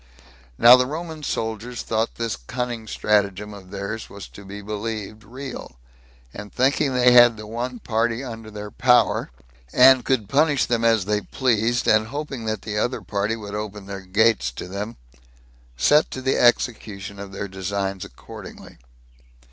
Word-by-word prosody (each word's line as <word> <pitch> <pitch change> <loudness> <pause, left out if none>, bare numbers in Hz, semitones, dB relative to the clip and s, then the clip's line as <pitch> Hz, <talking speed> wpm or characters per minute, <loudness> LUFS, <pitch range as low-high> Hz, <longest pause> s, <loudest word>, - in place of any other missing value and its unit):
Now 120 +2 +9
the 125 0 +1
Roman 160 +1 -6
soldiers 115 -2 -4
thought 110 0 -1
this 115 -2 -2
cunning 120 - -5
stratagem 105 -1 0
of 95 -2 -12
theirs 100 +3 -5
was 100 -1 -9
to 100 - -13
be 100 +1 -8
believed 110 0 -5
real, 125 - -8 0.6
and 105 0 -9
thinking 135 +1 +1
they 125 0 +5
had 120 -2 +7
the 110 - -8
one 120 +3 -4
party 115 +2 -1
under 115 -4 -8
their 105 -1 -8
power, 125 -1 +3 0.4
and 130 0 +7
could 120 -6 0
punish 145 +3 +3
them 120 -1 0
as 115 -4 +3
they 105 0 0
pleased, 120 0 0
and 110 0 +4
hoping 140 -3 -5
that 110 0 -3
the 105 -1 -3
other 120 +4 -1
party 105 +2 -1
would 105 -3 -8
open 105 -1 -5
their 100 0 -7
gates 100 - +2
to - - -7
them, 100 +4 -5 0.8
set 150 - +4
to 130 - -6
the 130 - +1
execution 105 -4 +1
of 100 -1 -8
their 100 +1 -5
designs 95 0 -3
accordingly. - - -12
110 Hz, 160 wpm, -23 LUFS, 100-125 Hz, 0.8 s, Now